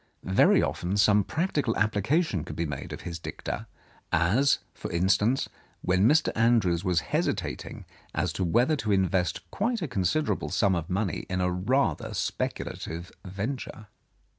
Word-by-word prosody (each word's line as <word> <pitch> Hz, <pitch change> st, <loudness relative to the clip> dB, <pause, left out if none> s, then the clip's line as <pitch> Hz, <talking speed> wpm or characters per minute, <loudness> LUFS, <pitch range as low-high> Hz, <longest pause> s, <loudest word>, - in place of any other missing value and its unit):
Very 95 Hz, +1 st, +4 dB
often 90 Hz, +3 st, -1 dB
some 105 Hz, 0 st, +5 dB
practical 145 Hz, -, -1 dB
application 110 Hz, -, +1 dB
could -, -, -7 dB
be 85 Hz, -, -1 dB
made 75 Hz, -3 st, -5 dB
of -, -, -6 dB
his 85 Hz, -1 st, -6 dB
dicta, -, -, -5 dB, 0.4 s
as, 125 Hz, +12 st, +3 dB, 0.2 s
for -, -, -7 dB
instance, 100 Hz, +8 st, +2 dB, 0.4 s
when 95 Hz, +5 st, +4 dB
Mr. 155 Hz, +2 st, +3 dB
Andrews 110 Hz, -7 st, +3 dB
was 90 Hz, -4 st, +2 dB
hesi -, -, +2 dB
tating -, -, -6 dB, 0.3 s
as 90 Hz, -2 st, -1 dB
to 95 Hz, -, -2 dB
whether 120 Hz, -, +3 dB
to 110 Hz, -6 st, -2 dB
invest 95 Hz, -2 st, +1 dB
quite 225 Hz, 0 st, -1 dB
a -, -, -1 dB
considerable 125 Hz, -, 0 dB
sum 100 Hz, -3 st, +2 dB
of 85 Hz, -2 st, -2 dB
money 95 Hz, 0 st, -2 dB
in 95 Hz, -1 st, -1 dB
a 90 Hz, 0 st, +1 dB
rather 120 Hz, +10 st, 0 dB
speculative 85 Hz, +2 st, -3 dB
venture. 105 Hz, +2 st, -5 dB
100 Hz, 150 wpm, -27 LUFS, 90-125 Hz, 0.4 s, some